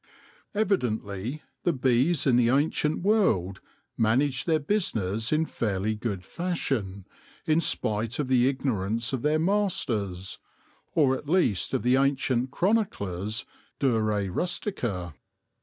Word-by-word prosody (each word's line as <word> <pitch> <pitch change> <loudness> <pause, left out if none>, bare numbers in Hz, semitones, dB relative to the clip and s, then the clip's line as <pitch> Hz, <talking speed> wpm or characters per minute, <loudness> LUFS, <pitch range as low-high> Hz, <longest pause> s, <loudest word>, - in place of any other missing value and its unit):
Evidently 125 - -1 0.2
the 175 - +1
bees 130 +4 +2
in 130 - +4
the 120 -1 +4
ancient 150 +4 +1
world 110 - +2 0.3
managed 125 +6 +1
their 160 -2 +4
business 115 - -1
in 155 +1 +2
fairly 105 -5 -1
good 105 -4 -4
fashion, 125 - -3 0.4
in 155 +1 +3
spite 110 -5 0
of 145 - -1
the 125 -1 +4
ignorance 115 -3 -1
of 130 - -1
their 150 +3 +2
masters, 125 - -1 0.6
or 135 -4 +4
at 140 +2 -8
least 160 - +2
of 130 - -1
the 125 +2 +4
ancient 135 -2 +1
chroniclers 110 - -1 0.3
de 135 - +2
re 105 -3 0
rustica. 100 - -2
125 Hz, 125 wpm, -27 LUFS, 105-155 Hz, 0.6 s, in